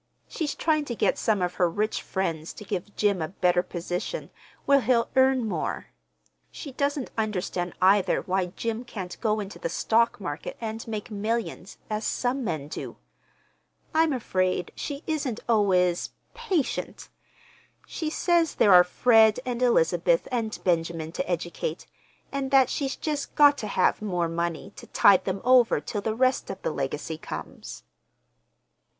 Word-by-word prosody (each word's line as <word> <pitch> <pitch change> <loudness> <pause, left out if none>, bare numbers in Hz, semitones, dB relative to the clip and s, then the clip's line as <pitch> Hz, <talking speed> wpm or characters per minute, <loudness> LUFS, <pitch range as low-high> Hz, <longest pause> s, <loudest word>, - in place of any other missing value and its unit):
She's 315 -5 -3
trying 310 -2 +1
to 240 - -4
get - - +1
some 210 -4 +1
of 180 0 -1
her 175 - +4
rich 210 +6 -1
friends 165 -4 -3
to - - -10
give 200 0 -5
Jim 200 -4 +1
a 160 - -1
better 180 0 +2
position, 180 - -5 0.3
where 280 -1 +5
he'll 235 0 +1
earn 260 -2 +4
more. - - -3 0.6
She 280 - -8
doesn't 280 0 -2
understand, 185 -4 -2
either, 195 +1 +4
why 185 0 0
Jim 225 +5 -4
can't 190 -7 -7
go 215 -2 +1
into 205 -1 -7
the - - -3
stock 230 +7 +1
market 145 -6 -5
and 225 0 -5
make 220 0 -5
millions, 215 -2 -3
as 215 0 -3
some 255 +2 -1
men 155 -9 -3
do. - - -7 1.0
I'm 320 0 +3
afraid 185 -8 -1
she 285 0 -5
isn't 280 -8 -2
always—patient. 215 - 0 0.8
She 315 - -4
says 335 0 +1
there 200 - +5
are 180 0 +9
Fred 220 +4 +4
and 250 -1 -3
Elizabeth - - +2
and 225 -3 -2
Benjamin 165 -2 0
to 175 - -4
educate, 170 -1 -3 0.5
and 275 -1 -2
that 265 -2 +4
she's 275 -2 -2
just 300 -2 -4
got 290 -1 +7
to 215 - -4
have 205 - +1
more 180 -5 -1
money 170 +3 -3
to - - -11
tide 190 -2 +5
them 190 0 -2
over 250 -7 +5
till 175 +8 -4
the 220 +1 -2
rest 255 +2 +1
of 195 0 -5
the - - 0
legacy 150 +3 -4
comes." - - -8
215 Hz, 155 wpm, -26 LUFS, 180-255 Hz, 1.0 s, are